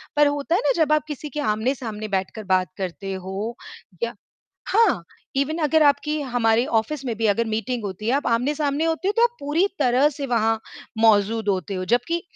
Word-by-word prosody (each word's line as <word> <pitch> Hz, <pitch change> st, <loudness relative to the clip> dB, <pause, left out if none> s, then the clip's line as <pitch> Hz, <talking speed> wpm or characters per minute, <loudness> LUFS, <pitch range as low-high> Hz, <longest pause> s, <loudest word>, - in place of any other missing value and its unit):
पर 295 Hz, 0 st, +5 dB
होता 290 Hz, +4 st, 0 dB
है 405 Hz, -, +2 dB
ना -, -, +4 dB
जब 305 Hz, -, -1 dB
आप 305 Hz, -, +2 dB
किसी 300 Hz, 0 st, -6 dB
के 300 Hz, -, -5 dB
आमने-सामने 220 Hz, -2 st, -2 dB
बैठकर 195 Hz, +2 st, -3 dB
बात 185 Hz, -2 st, +2 dB
करते 195 Hz, +1 st, -4 dB
हो 190 Hz, +5 st, -5 dB, 0.5 s
या 235 Hz, +1 st, -2 dB, 0.5 s
हाँ, 405 Hz, -, +3 dB, 0.3 s
इवन 285 Hz, +4 st, 0 dB
अगर 310 Hz, +1 st, +4 dB
आपकी 300 Hz, +1 st, +2 dB
हमारे 235 Hz, -3 st, +2 dB
ऑफ़िस 265 Hz, +4 st, -1 dB
में 240 Hz, -3 st, -2 dB
भी 225 Hz, -, 0 dB
अगर 215 Hz, +3 st, +2 dB
मीटिंग 225 Hz, +2 st, -2 dB
होती 200 Hz, +2 st, -5 dB
है, 245 Hz, -, +3 dB
आप 285 Hz, -, 0 dB
आमने-सामने 285 Hz, +5 st, 0 dB
होते 330 Hz, +3 st, 0 dB
हो, 410 Hz, -, +2 dB
तो 465 Hz, -, +4 dB
आप 480 Hz, 0 st, +2 dB
पूरी 305 Hz, +7 st, +1 dB
तरह 255 Hz, +4 st, +4 dB
से 285 Hz, -1 st, -5 dB
वहाँ 225 Hz, -2 st, +1 dB, 0.4 s
मौजूद 220 Hz, 0 st, +3 dB
होते 195 Hz, +1 st, -1 dB
हो, 185 Hz, 0 st, -3 dB
जबकि 245 Hz, -, 0 dB
245 Hz, 195 wpm, -23 LUFS, 215-295 Hz, 0.5 s, पर